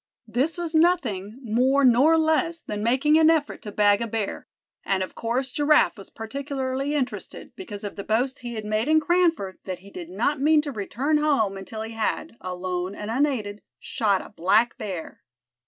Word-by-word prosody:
This 260 Hz, +10 st, 0 dB
was 340 Hz, -2 st, -3 dB
nothing 265 Hz, -, +1 dB
more 255 Hz, +5 st, +3 dB
nor 265 Hz, +7 st, +5 dB
less 320 Hz, +1 st, +1 dB
than 210 Hz, -7 st, -5 dB
making 270 Hz, +7 st, +3 dB
an 320 Hz, 0 st, +6 dB
effort 315 Hz, -3 st, +1 dB
to 210 Hz, -, -7 dB
bag 205 Hz, 0 st, +3 dB
a 235 Hz, -, -1 dB
bear; 220 Hz, -2 st, -4 dB, 0.4 s
and 190 Hz, -1 st, 0 dB
of 185 Hz, -, -7 dB
course 250 Hz, +3 st, -2 dB
Giraffe 295 Hz, +2 st, +3 dB
was 195 Hz, -3 st, -11 dB
particularly 270 Hz, +3 st, -3 dB
interested, 265 Hz, -3 st, -4 dB
because 210 Hz, -, -8 dB
of 205 Hz, -, -5 dB
the 200 Hz, -, -4 dB
boast 250 Hz, +6 st, 0 dB
he 240 Hz, -1 st, -6 dB
had 215 Hz, -1 st, -5 dB
made 215 Hz, +3 st, 0 dB
in 315 Hz, 0 st, +5 dB
Cranford 330 Hz, -, +1 dB
that 185 Hz, -2 st, -5 dB
he 200 Hz, -, -13 dB
did 175 Hz, -3 st, -8 dB
not 240 Hz, +9 st, -1 dB
mean 300 Hz, +1 st, +4 dB
to 290 Hz, -, -4 dB
return 265 Hz, +7 st, -1 dB
home 275 Hz, -10 st, +1 dB
until 215 Hz, +3 st, -6 dB
he 225 Hz, -, -7 dB
had, 225 Hz, +1 st, -2 dB
alone 180 Hz, +1 st, -4 dB
and 210 Hz, +1 st, -5 dB
unaided, 230 Hz, -6 st, -1 dB, 0.2 s
shot 200 Hz, -4 st, 0 dB
a -, -, -12 dB
black 215 Hz, +5 st, +2 dB
bear. 185 Hz, -6 st, -6 dB
240 Hz, 185 wpm, -25 LUFS, 205-295 Hz, 0.4 s, an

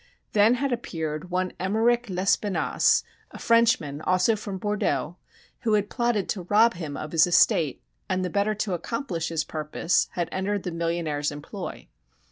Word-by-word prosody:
Then 215 Hz, +3 st, +5 dB
had 270 Hz, +1 st, -1 dB
appeared 160 Hz, -7 st, -4 dB
one 185 Hz, 0 st, -1 dB
Emmeric 225 Hz, +5 st, +1 dB
Lespinasse, 190 Hz, 0 st, +2 dB, 0.3 s
a -, -, -11 dB
Frenchman, 230 Hz, -11 st, +2 dB
also 185 Hz, +6 st, +2 dB
from 205 Hz, -2 st, -6 dB
Bordeaux, 180 Hz, -6 st, -1 dB, 0.4 s
who 220 Hz, -, 0 dB
had 205 Hz, -1 st, +1 dB
plotted 235 Hz, -5 st, 0 dB
to 195 Hz, -, -2 dB
rob 225 Hz, +3 st, +5 dB
him 155 Hz, -5 st, -6 dB
of 155 Hz, -, -6 dB
his 165 Hz, +1 st, +5 dB
estate, 170 Hz, -, +3 dB, 0.3 s
and 185 Hz, 0 st, 0 dB
the 180 Hz, -, -3 dB
better 205 Hz, +1 st, +1 dB
to 205 Hz, -2 st, -2 dB
accomplish 175 Hz, -, -3 dB
his 160 Hz, -2 st, -1 dB
purpose 155 Hz, +2 st, 0 dB
had 175 Hz, -2 st, -1 dB
entered 200 Hz, +1 st, -2 dB
the 180 Hz, -, -3 dB
millionaire's 165 Hz, -3 st, -1 dB
employ. 145 Hz, 0 st, -7 dB
185 Hz, 155 wpm, -25 LUFS, 165-215 Hz, 0.4 s, Then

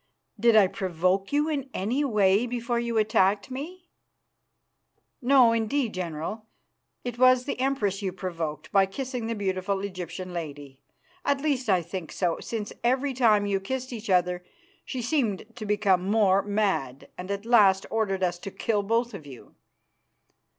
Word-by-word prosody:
"Did 230 Hz, +1 st, +4 dB
I 210 Hz, -2 st, +7 dB
provoke 185 Hz, 0 st, -1 dB
you 295 Hz, +2 st, +2 dB
in 280 Hz, -4 st, -2 dB
any 240 Hz, +10 st, 0 dB
way 210 Hz, -3 st, +3 dB
before 240 Hz, 0 st, -2 dB
you 235 Hz, -1 st, -2 dB
attacked 210 Hz, -1 st, +2 dB
me?" 340 Hz, +7 st, -7 dB, 1.3 s
"No, 255 Hz, -2 st, +6 dB
indeed, 230 Hz, +2 st, 0 dB
General. 180 Hz, +5 st, -5 dB, 0.6 s
It 245 Hz, -1 st, -5 dB
was 255 Hz, 0 st, +5 dB
the 280 Hz, -, -4 dB
Empress 225 Hz, -7 st, 0 dB
you 190 Hz, -2 st, -2 dB
provoked 165 Hz, -5 st, -5 dB
by 195 Hz, -1 st, +4 dB
kissing 250 Hz, +2 st, -4 dB
the 230 Hz, -, -2 dB
beautiful 190 Hz, -1 st, -1 dB
Egyptian 185 Hz, -2 st, -6 dB
lady. 145 Hz, -5 st, -7 dB, 0.4 s
At 280 Hz, -1 st, +1 dB
least, 270 Hz, -6 st, -1 dB
I 185 Hz, -3 st, +3 dB
think 170 Hz, -1 st, -6 dB
so, 175 Hz, -3 st, -1 dB
since 215 Hz, -3 st, -5 dB
every 260 Hz, +3 st, +1 dB
time 220 Hz, -5 st, +3 dB
you 200 Hz, -1 st, 0 dB
kissed 255 Hz, +5 st, -4 dB
each 225 Hz, -2 st, -7 dB
other 180 Hz, -1 st, +2 dB, 0.4 s
she 255 Hz, -3 st, -4 dB
seemed 235 Hz, -8 st, 0 dB
to 215 Hz, -3 st, -7 dB
become 200 Hz, -3 st, +2 dB
more 200 Hz, -3 st, +4 dB
mad, 190 Hz, -11 st, -1 dB
and 180 Hz, +1 st, -8 dB
at 200 Hz, +1 st, -3 dB
last 205 Hz, -5 st, +5 dB
ordered 195 Hz, -4 st, 0 dB
us 175 Hz, -1 st, 0 dB
to 195 Hz, -, -6 dB
kill 210 Hz, +1 st, -1 dB
both 230 Hz, +3 st, 0 dB
of 155 Hz, -7 st, -9 dB
you." 130 Hz, -3 st, -13 dB
205 Hz, 155 wpm, -26 LUFS, 185-240 Hz, 1.3 s, I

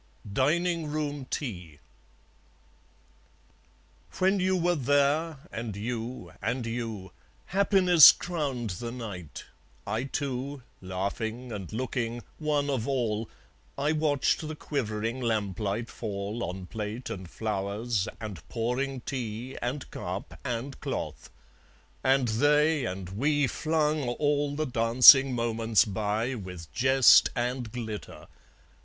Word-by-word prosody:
Dining 165 Hz, -, +1 dB
Room 145 Hz, -2 st, -3 dB
Tea 90 Hz, -, -5 dB, 2.4 s
When 190 Hz, +2 st, +3 dB
you 185 Hz, 0 st, +2 dB
were 175 Hz, 0 st, +2 dB
there, 145 Hz, +2 st, +1 dB
and 110 Hz, -3 st, -5 dB
you, 115 Hz, -3 st, -5 dB
and 125 Hz, -2 st, -2 dB
you, 115 Hz, -5 st, -4 dB, 0.3 s
Happiness 185 Hz, -4 st, +7 dB
crowned 140 Hz, -, -3 dB
the 115 Hz, +7 st, -5 dB
night; 100 Hz, -, -7 dB, 0.4 s
I 110 Hz, +5 st, -2 dB
too, 135 Hz, 0 st, -4 dB, 0.2 s
Laughing 105 Hz, +6 st, -4 dB
and 100 Hz, -5 st, -6 dB
looking, 120 Hz, 0 st, -3 dB, 0.2 s
one 150 Hz, -2 st, 0 dB
of 130 Hz, -4 st, -1 dB
all, 115 Hz, -5 st, -1 dB, 0.5 s
I 145 Hz, +2 st, +1 dB
watched 155 Hz, 0 st, +1 dB
the 155 Hz, -, -5 dB
quivering 115 Hz, -4 st, -3 dB
lamplight 105 Hz, -1 st, -1 dB
fall 105 Hz, +1 st, -4 dB
On 90 Hz, +1 st, -6 dB
plate 110 Hz, +4 st, -5 dB
and 95 Hz, -3 st, -6 dB
flowers 105 Hz, +1 st, -2 dB
and 105 Hz, -8 st, -6 dB
pouring 125 Hz, +3 st, -2 dB
tea 120 Hz, -1 st, -5 dB
And 130 Hz, +4 st, -3 dB
cup -, -, -6 dB
and 125 Hz, +3 st, -4 dB
cloth; -, -, -4 dB, 0.7 s
and 135 Hz, -1 st, +3 dB
they 150 Hz, +5 st, +3 dB
and 95 Hz, -2 st, -5 dB
we 145 Hz, +9 st, +1 dB
Flung 155 Hz, -1 st, 0 dB
all 145 Hz, +2 st, 0 dB
the 155 Hz, +1 st, -1 dB
dancing 125 Hz, +2 st, +7 dB
moments 115 Hz, -3 st, +2 dB
by 110 Hz, +4 st, -1 dB
With 90 Hz, -8 st, -8 dB
jest 130 Hz, +1 st, +6 dB
and 120 Hz, -1 st, -2 dB
glitter. 110 Hz, -3 st, -7 dB
120 Hz, 110 wpm, -28 LUFS, 110-145 Hz, 2.4 s, Happiness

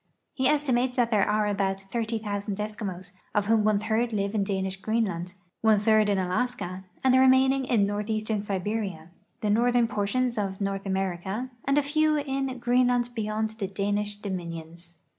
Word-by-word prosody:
He 260 Hz, -1 st, +1 dB
estimates 260 Hz, -4 st, +1 dB
that 240 Hz, -2 st, +2 dB
there 205 Hz, -2 st, +3 dB
are 210 Hz, 0 st, +2 dB
about 195 Hz, -2 st, 0 dB
30,000 210 Hz, -1 st, -3 dB
Eskimos, 205 Hz, -4 st, -5 dB, 0.2 s
of 205 Hz, -1 st, +2 dB
whom 220 Hz, 0 st, +3 dB
one 215 Hz, -1 st, +3 dB
third 225 Hz, +3 st, 0 dB
live 200 Hz, -1 st, -1 dB
in 210 Hz, -2 st, +1 dB
Danish 190 Hz, -1 st, -2 dB
Greenland, 195 Hz, -5 st, -1 dB, 0.3 s
one 220 Hz, -1 st, +5 dB
third 215 Hz, 0 st, +3 dB
in 200 Hz, -, +2 dB
Alaska, 190 Hz, -1 st, -2 dB, 0.2 s
and 260 Hz, -1 st, +4 dB
the 260 Hz, -, +6 dB
remainder 265 Hz, 0 st, +4 dB
in 215 Hz, -5 st, +4 dB
northeastern 215 Hz, +1 st, -1 dB
Siberia, 195 Hz, -4 st, -3 dB, 0.3 s
the 210 Hz, -, +1 dB
northern 240 Hz, +2 st, +3 dB
portions 235 Hz, +2 st, 0 dB
of 195 Hz, -2 st, -3 dB
North 195 Hz, 0 st, -2 dB
America, 190 Hz, +5 st, -2 dB
and 275 Hz, +1 st, +2 dB
a 295 Hz, -, +4 dB
few 310 Hz, +1 st, +2 dB
in 270 Hz, -2 st, -2 dB
Greenland 245 Hz, 0 st, +2 dB
beyond 215 Hz, -1 st, -2 dB
the 220 Hz, -3 st, -4 dB
Danish 205 Hz, +1 st, -1 dB
dominions. 170 Hz, -4 st, -7 dB
210 Hz, 160 wpm, -27 LUFS, 195-245 Hz, 0.3 s, the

